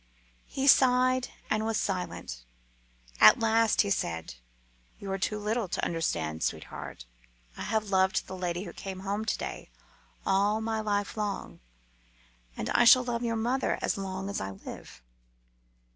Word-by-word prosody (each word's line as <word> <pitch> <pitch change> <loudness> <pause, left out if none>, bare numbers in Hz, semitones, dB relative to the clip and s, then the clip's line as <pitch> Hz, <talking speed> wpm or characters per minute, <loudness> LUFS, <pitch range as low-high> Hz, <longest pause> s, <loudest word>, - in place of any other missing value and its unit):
He 270 - -3
sighed 255 -1 +5 0.2
and 215 0 0
was 220 -1 0
silent. 180 - -3 0.8
At 110 - +8
last 225 -1 +3
he 200 - -1
said, 80 - -2 0.6
"You 195 -1 -6
are 195 - -2
too 210 +2 -1
little 215 +1 -1
to - - -2
understand, 80 - -2
sweetheart. - - -5 0.5
I - - -8
have 215 -1 -1
loved 190 0 +2
the 190 - -7
lady 180 0 -3
who - - -8
came 190 -1 -7
home 200 +2 -2
to 215 - 0
day - - -6 0.6
all 200 +3 +2
my 220 0 -2
life 205 -2 -1
long, 210 -2 -4 1.0
and - - -3
I - - +4
shall 250 +2 +8
love 240 -1 -2
your 230 -1 -1
mother 245 +4 0
as - - +1
long 190 -1 -4
as 200 - -3
I 95 - -3
live." 95 -9 -10
205 Hz, 155 wpm, -29 LUFS, 185-225 Hz, 1.0 s, At